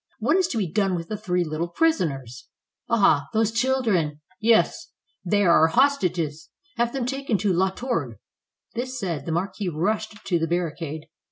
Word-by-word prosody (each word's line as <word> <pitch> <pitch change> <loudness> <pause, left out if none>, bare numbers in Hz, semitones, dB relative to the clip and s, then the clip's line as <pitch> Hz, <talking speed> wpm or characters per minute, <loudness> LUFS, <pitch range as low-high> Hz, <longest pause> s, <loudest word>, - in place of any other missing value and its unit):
What 245 +9 +2
is 375 -2 +3
to 265 - -3
be 210 - +1
done 195 +2 +1
with 165 -1 -5
the 215 - -2
three 180 -4 0
little 160 +1 -3
prisoners?" 150 - -1 0.4
"Ah, 155 -11 +3
those 220 0 +2
children!" 225 - +1 0.2
"Yes." 225 0 +2 0.4
"They 205 +3 +2
are 170 -3 +5
our 160 - +6
hostages. 175 - +1 0.3
Have 235 0 +1
them 265 -2 -2
taken 270 -3 -1
to 195 -1 +1
La 190 +2 +2
Tourgue." 175 - -3 0.6
This 255 +2 -4
said, 170 - -3
the - - -1
marquis 190 +3 -2
rushed 210 +6 -2
to 180 -4 +1
the 165 - 0
barricade. 165 -2 -3
190 Hz, 170 wpm, -24 LUFS, 165-230 Hz, 0.6 s, our